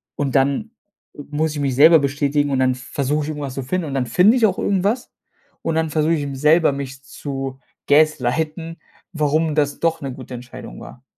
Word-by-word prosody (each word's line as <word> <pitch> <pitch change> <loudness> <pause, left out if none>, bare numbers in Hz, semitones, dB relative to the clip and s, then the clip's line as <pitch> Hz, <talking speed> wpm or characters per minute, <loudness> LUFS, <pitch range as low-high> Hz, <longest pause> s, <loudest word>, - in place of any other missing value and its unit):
und 140 -2 -2
dann 140 +11 +1 0.4
muss 150 +2 -3
ich 150 - -5
mich 135 -3 0
selber 160 +4 +7
bestätigen 145 +1 0
und 135 - +1
dann 130 -1 +2
versuche 140 +3 -2
ich - - -5
irgendwas 145 -3 -5
zu 135 - -4
finden 165 +6 -2
und 140 - -5
dann 130 -2 0
finde 180 - +4
ich 235 - +4
auch 195 -3 +1
irgendwas 200 +5 0 0.5
und 165 - -2
dann 160 0 0
versuche 155 +2 +1
ich 160 - 0
eben 140 -1 -4
selber 150 +3 +4
mich 135 -1 -7
zu 135 -1 -6 0.3
gaslighten, 155 +3 +1 0.4
warum 155 0 +1
das 145 -2 0
doch 165 -1 0
'ne 135 -2 -4
gute 130 -1 -10
Entscheidung 120 - -9
war. 125 - -12
145 Hz, 195 wpm, -20 LUFS, 135-160 Hz, 0.5 s, selber